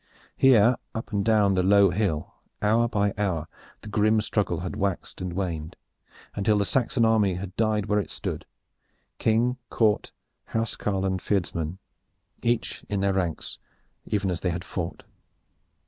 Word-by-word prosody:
Here, 120 -2 +5 0.2
up 115 - -5
and 100 -1 +1
down 105 -3 +4
the 95 - +2
low 100 0 +5
hill, 90 -5 -1 0.3
hour 115 +3 +3
by 100 -2 +1
hour 85 -6 -1 0.3
the - - -11
grim 105 +1 +3
struggle 100 -6 -1
had 90 - -4
waxed 100 -2 -3
and 90 -1 -3
waned, 85 -4 -3 0.6
until 105 +1 +2
the 100 - +2
Saxon 120 0 +2
army 105 -4 +3
had 95 +1 -6
died 110 -2 +1
where 105 0 +2
it 100 - -3
stood, - - -5 0.7
King, 120 +3 +2
court, 110 -2 +1 0.3
house 115 -1 -2
carl 95 -2 -1
and 95 -1 0
fyrdsman, 85 -4 -1 0.6
each 120 -1 -1
in 100 -2 -1
their 100 0 +2
ranks 90 -4 -2 0.5
even 100 -3 0
as 90 - -1
they 90 - -1
had 85 0 -3
fought. 85 0 -5
100 Hz, 155 wpm, -26 LUFS, 90-110 Hz, 0.7 s, Here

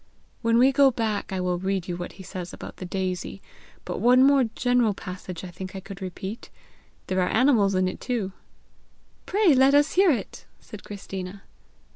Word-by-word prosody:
When 230 -1 +3
we 255 +3 +6
go 275 0 +5
back 225 -5 -2
I 190 - -2
will 180 -1 -1
read 190 -1 -2
you 175 - -3
what 175 0 -6
he 190 - -11
says 180 -1 -7
about - - -9
the 185 - -6
daisy; 185 0 -3 0.5
but - - -4
one 250 +2 +5
more 275 -1 +5
general 245 -4 +2
passage 185 -2 -7
I 185 - -6
think 185 +3 -8
I - - -4
could 195 +1 -10
repeat. 190 +4 -6 0.6
There 185 0 0
are 180 - +1
animals 220 -6 +3
in 185 0 +2
it 185 - -5
too!" 225 -7 -2 1.0
"Pray 395 -5 +4
let 265 +2 +5
us 290 +1 +4
hear 380 0 +5
it," 240 -10 -2
said 215 - -11
Christina. 195 -1 -7
195 Hz, 185 wpm, -25 LUFS, 185-250 Hz, 1.0 s, we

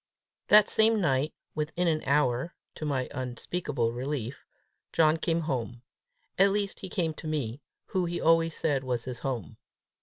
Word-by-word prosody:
That 210 0 +7
same 220 0 +4
night, 140 -4 +1 0.2
within 160 +3 -1
an 155 -2 +2
hour, 140 +1 +1 0.2
to 155 - -6
my 135 -4 -1
unspeakable 130 0 -2
relief, 130 0 -4 0.5
John 160 -1 +4
came 165 0 0
home 125 -5 -3 0.6
at 195 +1 +7
least 200 -1 -1
he 190 - -7
came 165 -3 -1
to 155 - -8
me, 145 -4 -2 0.2
who 185 -2 -1
he 175 0 -2
always 165 0 +3
said 140 -4 +1
was 125 -2 -2
his 125 -2 -5
home. 125 - -4
150 Hz, 155 wpm, -28 LUFS, 130-170 Hz, 0.6 s, That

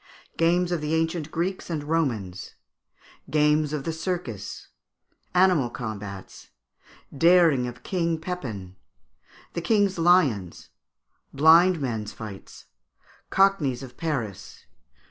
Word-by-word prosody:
Games 175 +2 +2
of 175 -3 -1
the 150 +1 -1
Ancient 165 -1 -1
Greeks 180 +4 -3
and 155 -3 -3
Romans. 120 - -2 0.7
Games 150 0 +2
of 150 -3 -3
the 165 - -3
Circus. 160 - -5 0.7
Animal 180 -9 +4
Combats. 105 -5 -8 0.7
Daring 165 -5 +4
of 120 0 -9
King 170 -3 -1
Pepin. 115 - -6 0.8
The 170 - -3
King's 200 -1 +1
Lions. 145 - +2 0.6
Blind 165 +4 +5
Men's 115 -6 -3
Fights. 105 -4 -10 0.6
Cockneys 170 -10 +2
of 125 -2 -11
Paris. 125 - -5
155 Hz, 105 wpm, -25 LUFS, 120-175 Hz, 0.8 s, Blind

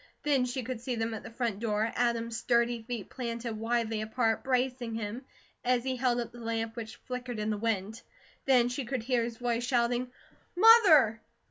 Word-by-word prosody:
Then 275 -4 +2
she 250 +1 -3
could 240 -1 -5
see 245 0 -3
them 225 0 -2
at 220 - -5
the - - -9
front 230 -3 -2
door, 220 0 0
Adam's 235 -1 0
sturdy 235 0 +1
feet 225 -3 -5
planted 235 -2 -4
widely 225 0 -1
apart, 225 +1 0
bracing 250 -2 -1
him, 225 +4 -5 0.4
as 250 -1 +2
he 260 0 -1
held 245 -1 +1
up 235 -1 -4
the 240 - -12
lamp 225 -1 -3
which 220 -2 -6
flickered 250 -2 -5
in 215 0 -1
the 210 - -1
wind. 220 0 -2 0.4
Then 250 -3 +4
she 250 +3 -3
could 250 -1 -3
hear 245 -1 +1
his 230 -1 -5
voice 240 -1 -1
shouting: 245 0 0 0.5
"Mother!" 355 - +7
235 Hz, 190 wpm, -30 LUFS, 225-250 Hz, 0.5 s, Mother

